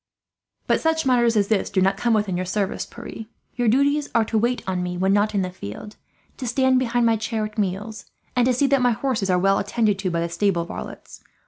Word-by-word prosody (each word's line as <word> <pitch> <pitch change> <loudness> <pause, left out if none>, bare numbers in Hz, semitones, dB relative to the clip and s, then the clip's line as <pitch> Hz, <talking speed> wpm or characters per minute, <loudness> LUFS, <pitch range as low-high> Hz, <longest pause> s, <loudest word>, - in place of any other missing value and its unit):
"But - - +1
such 320 -1 +1
matters 240 -3 +3
as 200 -1 +2
this 215 -3 +1
do 195 - 0
not 195 +1 +3
come 230 +3 +1
within 205 -4 0
your 180 - -1
service, 195 +1 -2
Pierre. 235 -1 -9 0.3
Your 245 -2 0
duties 285 +5 +2
are 230 - +4
to 220 - -1
wait 240 +3 0
on 185 -1 -2
me 180 0 -3
when 190 +2 +2
not 205 +1 +1
in 195 - +2
the 180 - -4
field, 180 - -9 0.4
to 255 - -5
stand 260 +1 +3
behind 240 -1 +1
my 225 -1 +3
chair 220 0 -2
at 215 0 -8
meals, 210 +3 -3 0.3
and 245 0 +3
to 255 - +3
see 280 - +2
that 275 -1 +2
my 245 -1 +3
horses 220 -4 -1
are 180 - +3
well 195 +2 +3
attended 205 -1 0
to 190 -1 -1
by 170 -1 -1
the 170 - -1
stable 170 0 0
varlets. - - -9
215 Hz, 235 wpm, -23 LUFS, 195-245 Hz, 0.4 s, are